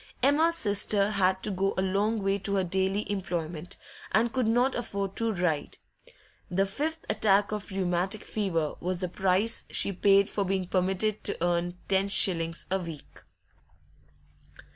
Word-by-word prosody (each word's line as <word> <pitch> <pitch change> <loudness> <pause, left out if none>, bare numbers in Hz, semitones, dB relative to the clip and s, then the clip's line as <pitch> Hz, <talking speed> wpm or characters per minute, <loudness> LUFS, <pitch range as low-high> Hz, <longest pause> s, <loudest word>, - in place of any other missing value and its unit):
Emma's 315 +5 +4
sister 205 -6 +1
had 190 -2 +1
to 210 - -1
go 195 +1 0
a - - +2
long 200 +3 0
way 195 +1 +1
to 200 +1 -1
her 190 - +2
daily 190 +3 0
employment, 175 -4 -4 0.3
and 230 +3 +2
could 255 -3 +1
not 245 +4 +2
afford 200 -5 -3
to 230 -1 0
ride; 175 -6 -1 0.7
the 195 +2 +1
fifth 310 +11 -3
attack 200 -1 +2
of 210 -1 -4
rheumatic 190 +1 -1
fever 165 -8 -1
was 180 0 -2
the 180 - 0
price 190 +5 +1
she - - +2
paid 195 +1 +4
for 200 - -1
being 190 -1 -1
permitted 190 +4 0
to - - -1
earn 175 0 0
ten 195 0 +2
shillings 165 -5 +1
a 190 - +2
week. 165 -5 -9
195 Hz, 155 wpm, -28 LUFS, 180-210 Hz, 0.7 s, Emma's